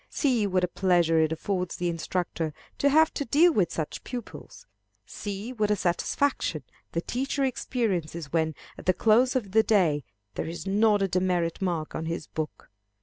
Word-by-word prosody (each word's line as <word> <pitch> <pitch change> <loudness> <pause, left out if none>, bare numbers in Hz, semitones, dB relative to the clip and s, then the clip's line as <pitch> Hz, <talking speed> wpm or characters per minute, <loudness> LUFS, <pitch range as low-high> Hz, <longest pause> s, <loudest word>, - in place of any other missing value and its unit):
See 245 -8 +1
what 185 -1 +1
a - - +3
pleasure 175 -3 +2
it 160 0 +2
affords 180 +2 -2
the 175 - -2
instructor 165 -2 -2 0.2
to 280 - +4
have 315 +2 +4
to - - -2
deal 315 +7 +4
with 190 - +2
such 155 -2 -4
pupils. 245 -3 -8 0.4
See 205 +4 -6
what 215 -4 0
a 210 - +3
satisfaction 180 - 0 0.3
the 170 - 0
teacher 270 +7 -2
experiences 180 - -2
when, 160 -2 +1 0.2
at - - -11
the 185 - +4
close 240 +4 +4
of 215 -7 -1
the 220 +2 +5
day, 175 -10 +2 0.3
there - - -3
is 170 +3 -6
not 205 +1 +3
a - - +2
demerit 180 -2 0
mark 170 -5 -2
on 160 - -4
his 165 -2 -3
book. 155 -9 -6
185 Hz, 175 wpm, -27 LUFS, 165-225 Hz, 0.4 s, the